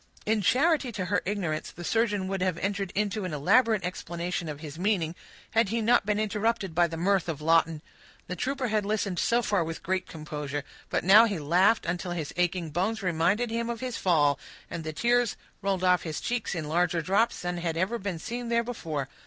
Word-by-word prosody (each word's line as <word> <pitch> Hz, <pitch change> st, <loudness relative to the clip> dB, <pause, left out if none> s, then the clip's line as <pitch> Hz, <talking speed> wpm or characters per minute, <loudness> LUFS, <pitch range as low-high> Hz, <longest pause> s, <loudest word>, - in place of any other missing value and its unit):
In 215 Hz, 0 st, +2 dB
charity 275 Hz, -, +3 dB
to 190 Hz, -4 st, -3 dB
her 200 Hz, +3 st, +1 dB
ignorance, 180 Hz, -6 st, -2 dB
the 175 Hz, -, -10 dB
surgeon 210 Hz, -1 st, +1 dB
would 195 Hz, -1 st, -2 dB
have 185 Hz, -2 st, 0 dB
entered 195 Hz, +1 st, -2 dB
into 210 Hz, +1 st, 0 dB
an 180 Hz, -4 st, -4 dB
elaborate 215 Hz, -, +3 dB
explanation 175 Hz, -1 st, -4 dB
of 145 Hz, -1 st, -6 dB
his 155 Hz, 0 st, -8 dB
meaning, 180 Hz, -5 st, +1 dB, 0.4 s
had 225 Hz, -3 st, +3 dB
he 230 Hz, +2 st, 0 dB
not 225 Hz, -2 st, +3 dB
been 210 Hz, 0 st, +1 dB
interrupted 215 Hz, -2 st, 0 dB
by 175 Hz, +1 st, +4 dB
the 165 Hz, 0 st, -6 dB
mirth 185 Hz, 0 st, +1 dB
of 155 Hz, -3 st, -3 dB
Lawton. 165 Hz, 0 st, +2 dB, 0.4 s
The 180 Hz, -, -5 dB
trooper 265 Hz, +3 st, -2 dB
had 215 Hz, -1 st, +1 dB
listened 200 Hz, -3 st, -1 dB
so 240 Hz, +1 st, +2 dB
far 205 Hz, -5 st, +1 dB
with 165 Hz, 0 st, -6 dB
great 185 Hz, 0 st, -1 dB
composure; 150 Hz, -2 st, -5 dB, 0.3 s
but -, -, 0 dB
now 205 Hz, +6 st, +8 dB
he 205 Hz, -5 st, -1 dB
laughed 180 Hz, +9 st, +3 dB
until 175 Hz, +1 st, -2 dB
his 160 Hz, -4 st, -4 dB
aching 175 Hz, -2 st, 0 dB
bones 200 Hz, +7 st, -1 dB
reminded 180 Hz, +7 st, +1 dB
him 230 Hz, +1 st, -1 dB
of 235 Hz, -1 st, -3 dB
his 255 Hz, -2 st, -4 dB
fall, 150 Hz, -6 st, +3 dB, 0.3 s
and 165 Hz, -, -4 dB
the 155 Hz, -, -4 dB
tears 240 Hz, +6 st, +2 dB, 0.3 s
rolled 195 Hz, -2 st, -1 dB
over 180 Hz, -1 st, +4 dB
his 160 Hz, -3 st, -4 dB
cheeks 240 Hz, -6 st, -2 dB
in 160 Hz, -3 st, -3 dB
larger 170 Hz, +1 st, +1 dB
drops 200 Hz, +8 st, +2 dB
than 175 Hz, 0 st, -2 dB
had 165 Hz, -2 st, -2 dB
ever 195 Hz, +7 st, 0 dB
been 190 Hz, -3 st, -3 dB
seen 240 Hz, +7 st, -5 dB
there 235 Hz, 0 st, +2 dB
before. 160 Hz, -, -4 dB
185 Hz, 205 wpm, -28 LUFS, 165-220 Hz, 0.4 s, now